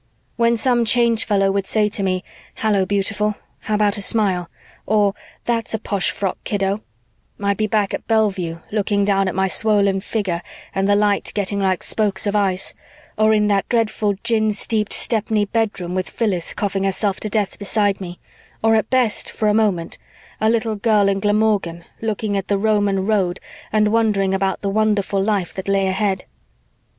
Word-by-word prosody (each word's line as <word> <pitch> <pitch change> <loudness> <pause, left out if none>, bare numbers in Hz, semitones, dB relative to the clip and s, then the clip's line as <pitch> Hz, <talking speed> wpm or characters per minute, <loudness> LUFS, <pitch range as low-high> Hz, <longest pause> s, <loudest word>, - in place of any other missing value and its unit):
"When 235 0 +2
some 240 +1 +2
Change 230 -1 +2
Fellow 195 -2 +2
would 195 -1 -1
say 215 -1 +2
to 205 - -3
me, 185 -1 0 0.3
'Hallo, 205 -4 +1
beautiful, 210 +1 0 0.2
how 215 - -2
about 210 -1 +2
a - - -2
smile?' 195 -5 +1 0.4
or 205 -1 +3 0.3
'That's 230 -1 -1
a - - 0
posh 200 -3 0
frock, 195 -2 -3
kiddo,' 200 0 -1 0.6
I'd 200 -1 0
be 215 - 0
back 210 -2 0
at - - -5
Bellevue 190 -7 0
looking 205 -1 +1
down 195 -1 +2
at 185 - -3
my 190 0 +2
swollen 200 -1 +2
figure 190 -4 -2 0.3
and 195 +1 0
the 205 - +5
light 205 -1 +1
getting 200 0 -1
like 190 -2 0
spokes 210 -3 +1
of 205 0 0
ice, 195 -2 +1 0.4
or 215 0 +3
in 210 -1 +3
that 200 -1 +1
dreadful 215 -3 +1
gin 225 -2 +2
steeped 210 +1 -1
Stepney 220 -2 0
bedroom 205 -5 -2
with 185 0 -2
Phyllis 190 -7 -1
coughing 195 -1 -1
herself 195 0 0
to 215 - -3
death 205 -2 -1
beside 205 -1 0
me, 175 -1 -7 0.4
or 225 0 +4
at 220 0 +1
best, 250 -5 +1
for 215 - 0
a - - +3
moment, 200 -6 0 0.4
a 220 - +2
little 225 -1 0
girl 205 -1 +2
in 195 0 0
Glamorgan 205 -5 0 0.2
looking 215 -1 -2
at 195 -1 -2
the 200 - +1
Roman 205 -2 +1
road 195 -4 0 0.3
and 215 -1 +3
wondering 210 -4 +2
about 195 0 -1
the 200 - -1
wonderful 205 -1 +1
life 200 -4 -1
that 190 0 -6
lay 195 0 +2
ahead." 190 0 -1
205 Hz, 180 wpm, -20 LUFS, 195-215 Hz, 0.6 s, the